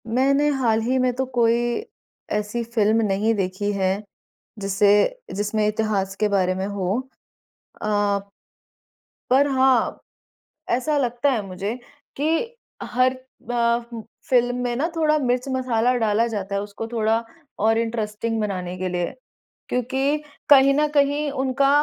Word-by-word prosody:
मैंने 275 Hz, +5 st, +2 dB
हाल 240 Hz, -6 st, +1 dB
ही 250 Hz, +4 st, 0 dB
में 255 Hz, -1 st, +2 dB
तो 265 Hz, +1 st, -1 dB
कोई 235 Hz, 0 st, +4 dB, 0.7 s
ऐसी 210 Hz, +3 st, -1 dB
फ़िल्म 225 Hz, -1 st, +2 dB
नहीं 205 Hz, +3 st, +1 dB
देखी 195 Hz, +1 st, -1 dB
है, 195 Hz, +1 st, 0 dB, 0.6 s
जिससे 205 Hz, -, +2 dB
जिसमें 210 Hz, +1 st, 0 dB
इतिहास 210 Hz, -3 st, -1 dB
के 215 Hz, -, +3 dB
बारे 185 Hz, -2 st, +1 dB
में 190 Hz, +1 st, -2 dB
हो। 200 Hz, 0 st, -1 dB, 0.8 s
अ 205 Hz, -1 st, +1 dB, 1.1 s
पर 275 Hz, +3 st, +5 dB
हाँ, 265 Hz, -3 st, +2 dB, 0.7 s
ऐसा 260 Hz, +5 st, +1 dB
लगता 245 Hz, +1 st, +1 dB
है 245 Hz, -5 st, 0 dB
मुझे, 195 Hz, +4 st, -4 dB, 0.4 s
कि 325 Hz, -, -1 dB, 0.3 s
हर 255 Hz, +1 st, +1 dB, 0.3 s
ब 235 Hz, 0 st, 0 dB, 0.3 s
फ़िल्म 245 Hz, -1 st, +3 dB
में 240 Hz, -1 st, -1 dB
ना 285 Hz, +6 st, +1 dB
थोड़ा 305 Hz, -1 st, +3 dB
मिर्च-मसाला 250 Hz, -2 st, 0 dB
डाला 225 Hz, -1 st, +2 dB
जाता 200 Hz, -4 st, -4 dB
है, 200 Hz, -, 0 dB
उसको 205 Hz, +2 st, -6 dB
थोड़ा 225 Hz, -1 st, +2 dB, 0.5 s
और 225 Hz, +1 st, +4 dB
इंटरेस्टिंग 225 Hz, 0 st, -2 dB
बनाने 185 Hz, -4 st, -3 dB
के 185 Hz, 0 st, -2 dB
लिए। 175 Hz, -1 st, -2 dB, 0.6 s
क्योंकि 265 Hz, +4 st, 0 dB, 0.3 s
कहीं 275 Hz, -1 st, +7 dB
न 300 Hz, +1 st, +2 dB
कहीं 290 Hz, +1 st, +2 dB
उनका 270 Hz, +1 st, +2 dB
230 Hz, 130 wpm, -23 LUFS, 205-260 Hz, 1.1 s, कहीं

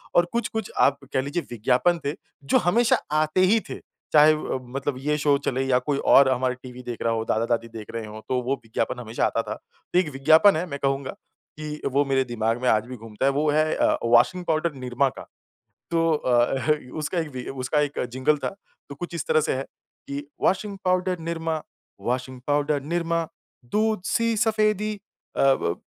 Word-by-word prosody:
और 175 Hz, -, +5 dB
कुछ-कुछ 220 Hz, -3 st, -2 dB
आप 140 Hz, 0 st, +4 dB, 0.2 s
कह 130 Hz, -, +2 dB
लीजिए 145 Hz, +5 st, -3 dB
विज्ञापन 130 Hz, +9 st, +2 dB
थे, 140 Hz, -, 0 dB, 0.3 s
जो 140 Hz, -, +3 dB
हमेशा 230 Hz, +5 st, +4 dB, 0.3 s
आते 155 Hz, +4 st, +1 dB
ही 205 Hz, +5 st, +5 dB
थे। -, -, -6 dB, 0.3 s
चाहे 155 Hz, 0 st, +8 dB
अ, 155 Hz, -3 st, -3 dB, 0.2 s
मतलब 140 Hz, 0 st, -2 dB
ये 150 Hz, +2 st, 0 dB
शो 145 Hz, -1 st, +3 dB
चले 130 Hz, +1 st, 0 dB
या 125 Hz, -1 st, +3 dB
कोई 140 Hz, +2 st, -1 dB, 0.2 s
और 140 Hz, -1 st, +7 dB
हमारा 130 Hz, 0 st, +1 dB
टीवी 125 Hz, 0 st, -9 dB
देख 120 Hz, -2 st, -6 dB
रहा 115 Hz, -, +1 dB
हो 110 Hz, 0 st, -2 dB
दादा-दादी 115 Hz, +1 st, 0 dB
देख 110 Hz, -, -8 dB
रहे 115 Hz, -, -3 dB
हों, 110 Hz, 0 st, -9 dB
तो 125 Hz, -1 st, +1 dB
वो 130 Hz, +3 st, 0 dB
विज्ञापन 115 Hz, +2 st, -2 dB
हमेशा 115 Hz, -1 st, -1 dB
आता 115 Hz, -, 0 dB
था। 110 Hz, -1 st, -5 dB, 0.4 s
तो 180 Hz, -, +5 dB
एक 180 Hz, -5 st, 0 dB
विज्ञापन 160 Hz, +8 st, +6 dB
है। 175 Hz, -, -1 dB
मैं 140 Hz, -2 st, -5 dB
कहूँगा 135 Hz, -1 st, 0 dB, 0.5 s
कि 150 Hz, 0 st, -6 dB
वो 145 Hz, +1 st, +3 dB
मेरे 135 Hz, -1 st, +2 dB
दिमाग 115 Hz, 0 st, -1 dB
में 125 Hz, -, +2 dB
आज 110 Hz, 0 st, +3 dB
भी 130 Hz, -, -7 dB
घूमता 110 Hz, +2 st, -4 dB
है। 140 Hz, -, +4 dB
वो 150 Hz, +2 st, +1 dB
है 155 Hz, +1 st, +2 dB
अ, -, -, +2 dB
वाशिंग 125 Hz, +10 st, +3 dB
पाउडर 160 Hz, +1 st, +1 dB
Nirma 130 Hz, +2 st, +1 dB
का। -, -, -8 dB, 0.7 s
तो 165 Hz, 0 st, +2 dB
अ, 130 Hz, +1 st, +2 dB, 0.3 s
उसका 155 Hz, +4 st, -2 dB
एक 160 Hz, -, -3 dB
वि 125 Hz, -, -5 dB, 0.2 s
उसका 150 Hz, +4 st, +1 dB
एक 145 Hz, 0 st, -1 dB
जिंगल 130 Hz, +4 st, +2 dB
था। -, -, +1 dB, 0.4 s
तो 140 Hz, -, -7 dB
कुछ 175 Hz, +4 st, -7 dB
इस 165 Hz, -, -3 dB
तरह 155 Hz, -, +4 dB
से 155 Hz, -, 0 dB
है 135 Hz, -, -2 dB, 0.5 s
कि 140 Hz, +1 st, -5 dB, 0.2 s
washing 195 Hz, +2 st, +1 dB
powder 185 Hz, 0 st, +1 dB
Nirma, 165 Hz, -1 st, -2 dB, 0.4 s
washing 130 Hz, +1 st, -3 dB
powder 145 Hz, 0 st, +1 dB
Nirma, 170 Hz, +1 st, -1 dB, 0.5 s
दूध-सी 220 Hz, +1 st, +1 dB
सफ़ेदी 215 Hz, -1 st, +1 dB, 0.4 s
अ, -, -, +2 dB
व 135 Hz, -11 st, +2 dB
145 Hz, 195 wpm, -24 LUFS, 125-170 Hz, 0.7 s, चाहे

